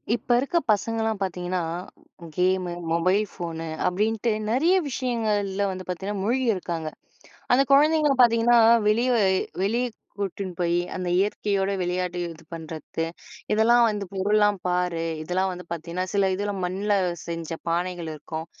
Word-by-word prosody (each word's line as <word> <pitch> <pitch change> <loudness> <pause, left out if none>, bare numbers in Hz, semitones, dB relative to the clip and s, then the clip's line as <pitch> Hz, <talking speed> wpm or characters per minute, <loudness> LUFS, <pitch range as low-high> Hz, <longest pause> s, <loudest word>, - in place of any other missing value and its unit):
இப்ப - - -10
இருக்க 280 +6 0
பசங்கலாம் 220 0 0
பார்த்தீங்கன்னா, 180 -1 -2 0.8
கேமு, 185 0 +1 0.2
மொபைல் 185 +5 +3
ஃபோனு, 165 -2 -5 0.2
அப்டின்ட்டு 220 +5 0 0.2
நெறைய 320 +10 +3
விஷயங்கள்ல 215 -6 -1
வந்து 185 0 -6
பாத்தீங்கன்னா 190 +2 -3
மூழ்கியிருக்காங்க. 200 -9 0 0.6
அந்த 270 +2 +5
குழந்தைங்கள 300 +1 +5
பாத்தீங்கன்னா, 235 0 +5 0.3
வெளிய 235 +4 +2
அ - - +4 0.4
வெளிய 235 +5 +1 0.3
கூட்டினு 195 -1 -3
போயி, 175 0 +2 0.2
அந்த 185 -1 -3
இயற்கையோட 200 -1 0
விளையாடு 180 0 -2 0.2
இது 165 +1 -17
பண்றத்து. 160 0 -5 0.5
இதெல்லாம் 235 +3 +5
வந்து 205 -2 -3
பொருள்லாம் 205 +1 +2
பாரு, 180 -2 0 0.2
இதெல்லாம் 185 +3 0
வந்து 180 0 -9
பாத்தீங்கன்னா, 170 +2 -4
சில 200 -1 +3
இதுல 205 +1 -2
மண்ல 195 +3 -1 0.3
செஞ்ச 165 -1 -5 0.2
பானைகள் 175 0 -2
இருக்கும். 160 +1 -6
195 Hz, 125 wpm, -25 LUFS, 180-220 Hz, 0.8 s, அந்த